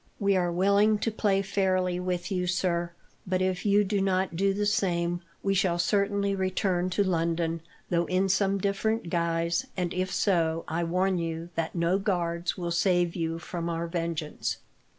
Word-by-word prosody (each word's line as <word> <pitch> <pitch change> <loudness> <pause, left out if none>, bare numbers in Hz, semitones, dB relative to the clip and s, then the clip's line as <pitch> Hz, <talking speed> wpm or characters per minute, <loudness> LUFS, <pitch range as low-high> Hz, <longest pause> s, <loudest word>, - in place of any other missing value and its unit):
We 200 -1 +2
are 175 -2 +1
willing 200 +4 +3
to 225 - -1
play 200 -2 +1
fairly 185 -2 0
with 180 0 -3
you, 180 -1 0
sir, 175 -1 0 0.4
but 185 0 +1
if 185 +1 -1
you 205 +1 +5
do 200 0 0
not 190 -2 0
do 195 +3 +2
the 205 +1 -1
same, 175 -5 0 0.2
we 195 - +2
shall 185 -3 +2
certainly 200 +2 +1
return 185 -1 0
to 200 +3 +1
London, 165 -2 0 0.3
though 170 0 +2
in 185 +1 +1
some 195 +1 +2
different 200 0 -1
guise, 170 +6 0
and, 180 -1 -1
if 185 +1 -1
so, 165 -4 +1
I 170 +2 -1
warn 185 +2 +1
you 165 0 -4
that 165 +1 -3
no 170 +3 +2
guards 175 -3 -1
will 175 -2 -3
save 175 0 +2
you 165 -2 -2
from 170 0 -4
our 165 0 -2
vengeance." 165 - -3
180 Hz, 170 wpm, -28 LUFS, 170-195 Hz, 0.4 s, you